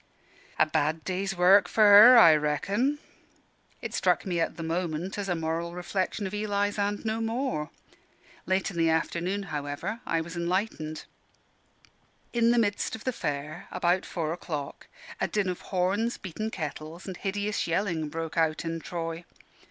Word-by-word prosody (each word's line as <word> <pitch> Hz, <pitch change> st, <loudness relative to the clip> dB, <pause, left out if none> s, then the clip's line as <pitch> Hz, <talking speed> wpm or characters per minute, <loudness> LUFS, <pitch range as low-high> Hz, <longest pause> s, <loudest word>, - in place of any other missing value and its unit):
"A -, -, +5 dB
bad 155 Hz, 0 st, 0 dB
day's 190 Hz, 0 st, -2 dB
work 190 Hz, +3 st, +6 dB
for 220 Hz, -, +3 dB
her, 210 Hz, +4 st, +10 dB
I 165 Hz, -9 st, +9 dB
reckon." 195 Hz, -, 0 dB, 0.9 s
It -, -, -5 dB
struck -, -, +1 dB
me 175 Hz, -3 st, -1 dB
at 165 Hz, -, -1 dB
the 165 Hz, -, -5 dB
moment 170 Hz, +1 st, -2 dB
as 200 Hz, -1 st, -3 dB
a 175 Hz, -, +1 dB
moral 165 Hz, +1 st, -2 dB
reflection 185 Hz, +3 st, -2 dB
of 190 Hz, -, -5 dB
Eli's, 205 Hz, -1 st, -1 dB
and 205 Hz, +2 st, -1 dB
no 220 Hz, +1 st, -1 dB
more. 225 Hz, -, -2 dB, 0.8 s
Late 190 Hz, +1 st, +1 dB
in 175 Hz, -, -9 dB
the 165 Hz, -1 st, +3 dB
afternoon, 175 Hz, +4 st, -1 dB
however, 145 Hz, +10 st, -4 dB
I 165 Hz, -, +1 dB
was 165 Hz, +1 st, -8 dB
enlightened. 170 Hz, -3 st, -2 dB, 1.3 s
In 235 Hz, -1 st, +3 dB
the 240 Hz, -, +3 dB
midst 205 Hz, -2 st, 0 dB
of 220 Hz, -, -11 dB
the 255 Hz, -, -1 dB
Fair, 150 Hz, -2 st, -4 dB
about 180 Hz, 0 st, +1 dB
four 160 Hz, -2 st, -3 dB
o'clock, 150 Hz, -5 st, -6 dB, 0.3 s
a -, -, +1 dB
din 210 Hz, -2 st, 0 dB
of 180 Hz, -, -4 dB
horns, 200 Hz, +6 st, 0 dB
beaten 210 Hz, +4 st, -5 dB
kettles, 160 Hz, -1 st, -6 dB
and 190 Hz, -, -6 dB
hideous 205 Hz, +2 st, -2 dB
yelling, 165 Hz, -3 st, -1 dB
broke 165 Hz, +1 st, -5 dB
out 160 Hz, 0 st, +1 dB
in 165 Hz, 0 st, -3 dB
Troy. 165 Hz, 0 st, -5 dB
180 Hz, 160 wpm, -28 LUFS, 165-205 Hz, 1.3 s, her